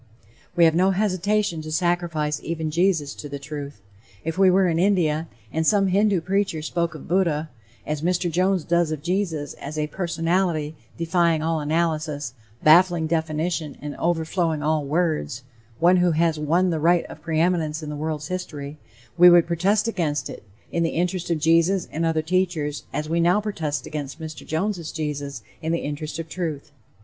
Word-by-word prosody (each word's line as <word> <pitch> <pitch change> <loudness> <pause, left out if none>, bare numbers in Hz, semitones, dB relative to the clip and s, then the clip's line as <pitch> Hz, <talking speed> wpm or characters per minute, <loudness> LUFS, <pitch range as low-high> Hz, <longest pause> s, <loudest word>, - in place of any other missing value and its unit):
We 170 -1 +6
have 160 - +5
no 185 +3 +3
hesitation 200 -2 0
to 155 0 -7
sacrifice 165 -3 0
even 160 -2 -3
Jesus 165 -4 +1
to 145 - -8
the 140 - -5
Truth. 140 -4 -7 0.4
If 165 +1 -3
we 190 0 +5
were 185 0 +4
in 165 -1 +1
India, 170 -5 +2 0.3
and 160 - 0
some 200 -2 +4
Hindoo 200 -1 +3
preacher 190 -3 -1
spoke 170 0 -1
of 155 - -10
Buddha, 165 -4 +1 0.3
as 150 -1 -3
Mr. 175 +1 0
Jones 185 +1 +1
does 170 -1 +1
of 150 -2 -4
Jesus, 170 -5 -1
as 150 +2 -6
a 150 - +1
"personality 165 -1 -1 0.2
defying 170 -1 +2
all 165 0 0
analysis, 155 -3 -1 0.3
baffling 170 +1 +5
definition 160 -1 -1
and 145 0 -6
overflowing 165 -2 0
all 155 0 +1
words" 145 - -1 0.3
one 175 +4 +5
who 175 -1 +3
has 160 -1 +1
"won 170 +5 +2
the 160 - -1
right 170 +2 +3
to - - -8
preeminence 160 -1 0
in 150 - -5
the - - -4
world's 150 0 -4
history," 150 -5 -5 0.4
we 180 0 +10
would 175 -1 +6
protest 195 +6 +1
against 165 -9 -1
it, - - -9 0.3
in 170 - 0
the 165 - +2
interest 180 0 -1
of 170 - +1
Jesus 165 +4 +3
and 165 +2 0
other 160 -1 0
teachers, 165 -4 -1
as 150 +2 -3
we 165 +2 0
now 175 +4 +4
protest 165 -9 -3
against 145 -1 -6
Mr. 160 -1 -8
Jones' 175 0 -2
Jesus, 145 -5 -4 0.2
in 160 - -2
the 170 - +2
interest 150 +2 -4
of 165 -1 -5
truth. 160 -4 -4
165 Hz, 175 wpm, -24 LUFS, 155-180 Hz, 0.4 s, we